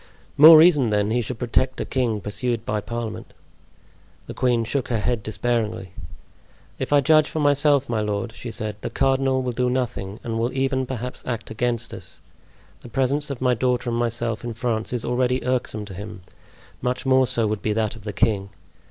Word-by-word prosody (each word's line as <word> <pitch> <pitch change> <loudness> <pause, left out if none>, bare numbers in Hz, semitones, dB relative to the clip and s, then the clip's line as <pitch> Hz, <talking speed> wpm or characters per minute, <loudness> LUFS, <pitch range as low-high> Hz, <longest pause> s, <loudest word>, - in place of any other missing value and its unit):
"More 155 +2 +10
reason, 155 -7 +6
then, 105 0 +1
he 120 +2 +1
should 120 +1 -5
protect 130 +2 0
a - - -2
king 120 -5 -1
pursued 115 +2 -3
by 105 0 -1
parliament." 115 0 -6 0.9
The - - -7
queen 125 -2 +1
shook 130 +3 -2
her 120 - 0
head 115 +1 -1
despairingly. 110 -3 -2 0.9
"If - - -3
I 145 -1 +5
judge 155 +2 +4
for 160 - -3
myself, 145 -1 +3
my 115 -2 -1
lord," 105 +2 -2
she 120 0 -8
said, 110 -2 -5
"the - - -3
cardinal 135 -1 +1
will 125 - -1
do 125 +1 0
nothing, 115 -6 -3
and 115 -1 -3
will 120 +2 0
even, 130 -1 0
perhaps, 125 0 -5
act 120 -2 -4
against 115 0 -2
us. - - -9 0.6
The - - -11
presence 140 +3 0
of 135 -3 -5
my 125 -1 +3
daughter 125 0 0
and 115 - -1
myself 115 -1 -2
in 120 -1 -5
France 115 -2 -2
is 125 -2 -3
already 125 +1 0
irksome 125 -4 -1
to 100 - -9
him; 100 0 -8 0.6
much 125 +1 -2
more 130 -1 +4
so 120 -2 +1
would 105 -1 -2
be 105 - 0
that 110 0 -1
of 110 - -13
the 105 - -4
king. 100 -2 0
120 Hz, 195 wpm, -23 LUFS, 110-130 Hz, 0.9 s, More